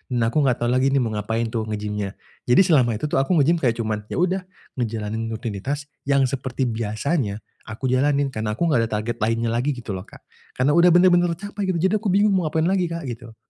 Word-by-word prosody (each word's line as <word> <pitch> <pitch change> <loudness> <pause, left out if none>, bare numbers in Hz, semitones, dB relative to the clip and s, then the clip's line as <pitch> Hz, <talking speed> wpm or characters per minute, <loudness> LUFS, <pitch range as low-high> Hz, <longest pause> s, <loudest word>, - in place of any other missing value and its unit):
Nah, 115 -1 +1
aku 155 - +2
enggak 125 -3 +2
tahu 120 - +1
lagi 130 +2 +3
nih - - +3
mau 115 - -2
ngapain 110 +2 -1
tuh 110 -1 -2
nge-gym-nya. 105 -1 -3 0.3
Jadi 125 - +6
selama 130 - +3
itu 135 - -3
tuh - - +2
aku 155 +7 +1
nge-gym 165 +4 +3
kayak 120 -3 +1
cuman, 110 -2 -2
ya - - -4
udah 185 +1 +1 0.4
ngejalanin 110 -1 -3
rutinitas 115 +5 -4 0.2
yang 140 -1 +3
seperti 130 0 -2
biasanya, 110 +1 -2 0.3
aku 110 +4 -6
jalanin. 140 +1 +2
Karena 110 -1 -2
aku 170 - +1
nggak 145 - +3
ada - - -7
target 120 +2 -4
lainnya 115 +1 +1
lagi 125 +5 0
gitu 115 -3 -7
loh, - - -6
Kak. - - -16 0.3
Karena 130 +3 +3
udah 175 +1 +7
benar-benar 175 -1 +4
tercapai, 205 +1 -5
gitu, 185 - 0
jadi 190 +3 +2
aku 220 - -2
bingung 205 +1 +4
mau 180 -4 +1
ngapain 160 +1 0
lagi, 185 -2 +1
Kak, 170 -1 -5
gitu. 115 -1 -8
125 Hz, 220 wpm, -22 LUFS, 110-165 Hz, 0.4 s, udah